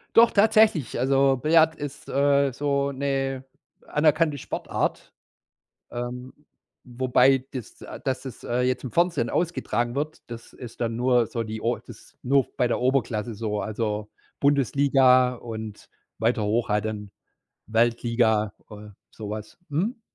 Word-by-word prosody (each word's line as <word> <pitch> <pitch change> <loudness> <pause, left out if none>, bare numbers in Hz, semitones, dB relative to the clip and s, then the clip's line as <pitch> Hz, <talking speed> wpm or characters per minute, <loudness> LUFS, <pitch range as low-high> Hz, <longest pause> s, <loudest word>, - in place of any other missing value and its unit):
Doch 230 +1 +7
tatsächlich, 210 - +3
also, 135 +1 +3
Billard 160 +4 +3
ist, 145 +1 -8
äh, 140 -1 +2
so 140 +1 0
'ne 135 -1 -2 0.4
anerkannte 155 0 +2
Sportart, - - -3 0.8
ähm, 125 +1 -6 0.5
wobei 130 +1 +3
dass 125 -5 -8
äh, - - -9
dass 130 -1 -2
es, 130 -3 -9
äh, 120 +1 0
jetzt 125 0 0
im 125 - -5
Fernsehen 170 -8 +1
ausgetragen 120 -9 -1
wird, 150 +2 -3
das 115 -1 -10
ist 120 -2 -11
dann 115 -1 -1
nur 120 -1 +2
so 115 +1 -3
die 110 0 -6
O 120 +1 0
das - - -15
nur 135 0 +3
bei 125 - +2
der 120 - -1
Oberklasse 120 -3 0
so. 105 -1 -3
Also, 105 0 -3 0.3
Bundesliga 135 -2 +4
und 110 -3 -8 0.3
weiter 115 0 +1
hoch 110 +3 0
halt 105 0 +1
dann, 105 -2 -5 0.6
Weltliga, 115 -2 +1 0.2
äh, 105 0 -11 0.2
sowas. 105 0 -7
Mhm. 200 - -1
125 Hz, 135 wpm, -25 LUFS, 115-140 Hz, 0.8 s, Doch